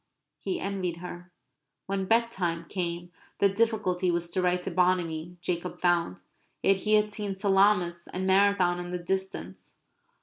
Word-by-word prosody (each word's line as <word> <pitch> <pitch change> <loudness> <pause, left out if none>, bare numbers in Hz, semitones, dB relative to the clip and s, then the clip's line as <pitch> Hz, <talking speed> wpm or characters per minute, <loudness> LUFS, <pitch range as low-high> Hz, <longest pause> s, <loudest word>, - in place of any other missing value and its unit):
He 365 -1 -3
envied 185 - -3
her. 175 0 -9 0.5
When 195 0 -2
bedtime 190 -7 +1
came 175 -1 -4 0.3
the 200 - +4
difficulty 195 -4 +1
was 170 0 -1
to 185 - 0
write 180 0 +1
to - - -3
Bonamy, 175 -2 0
Jacob 180 0 -3
found. 175 - +1 0.4
Yet 195 - +4
he 215 +2 +2
had 210 0 +2
seen 205 -3 -3
Salamis, 195 -3 +2
and 185 +1 -3
Marathon 190 -2 +3
in 175 0 -5
the 180 - -2
distance. 175 - -4
180 Hz, 145 wpm, -28 LUFS, 175-195 Hz, 0.5 s, the